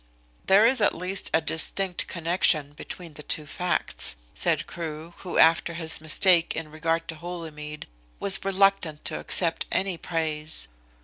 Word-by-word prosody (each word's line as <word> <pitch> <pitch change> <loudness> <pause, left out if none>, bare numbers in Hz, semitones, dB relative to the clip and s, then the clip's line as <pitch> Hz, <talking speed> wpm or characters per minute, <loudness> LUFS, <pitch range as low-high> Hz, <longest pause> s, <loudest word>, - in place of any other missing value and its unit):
"There 200 +3 +6
is 255 0 +3
at 205 - +3
least 185 +2 0
a 160 - +3
distinct 175 +3 0
connection 165 -4 +1
between 165 +2 -9
the 150 - -9
two 150 +1 -1
facts," 175 - -2 0.2
said - - +1
Crewe, 160 0 -7
who 180 - -5
after 165 +1 +4
his 160 -2 +2
mistake 170 +2 +3
in 160 -2 -5
regard 165 +1 -1
to 160 - -4
Holymead 155 -3 -7 0.3
was 195 -1 -1
reluctant 195 -5 +1
to - - -2
accept 165 -2 +2
any 190 -3 -1
praise. 155 -2 -3
165 Hz, 145 wpm, -26 LUFS, 155-185 Hz, 0.3 s, There